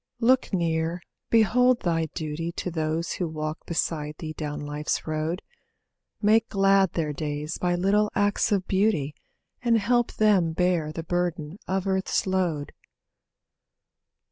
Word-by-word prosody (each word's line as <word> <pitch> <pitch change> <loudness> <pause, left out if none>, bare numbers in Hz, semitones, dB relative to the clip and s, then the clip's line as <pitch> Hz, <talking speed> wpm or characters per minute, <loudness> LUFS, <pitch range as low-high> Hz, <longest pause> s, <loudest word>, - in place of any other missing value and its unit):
Look 255 +2 +3
near, 170 -1 0 0.3
behold 245 +3 +4
thy 165 -2 0
duty 155 +2 -4
To 180 - -4
those 160 +1 -1
who 180 - -2
walk 155 0 -5
beside 155 -3 -2
thee 155 -1 -6
down 150 -1 -4
life's 145 +1 -2
road. 155 +3 -2 0.8
Make 220 +2 +4
glad 195 -2 +3
their 155 -3 -1
days 150 +1 -4
by 175 -1 +1
little 205 +4 +2
acts 205 +2 +2
of 195 -3 +1
beauty 190 -8 +1 0.5
And 235 -2 +3
help 240 +2 +1
them 195 -7 +3
bear 175 -3 +1
the 165 +1 -5
burden 175 0 -2
of 190 0 -1
earth's 190 -1 0
load. 180 -6 -1
175 Hz, 135 wpm, -26 LUFS, 155-195 Hz, 0.8 s, behold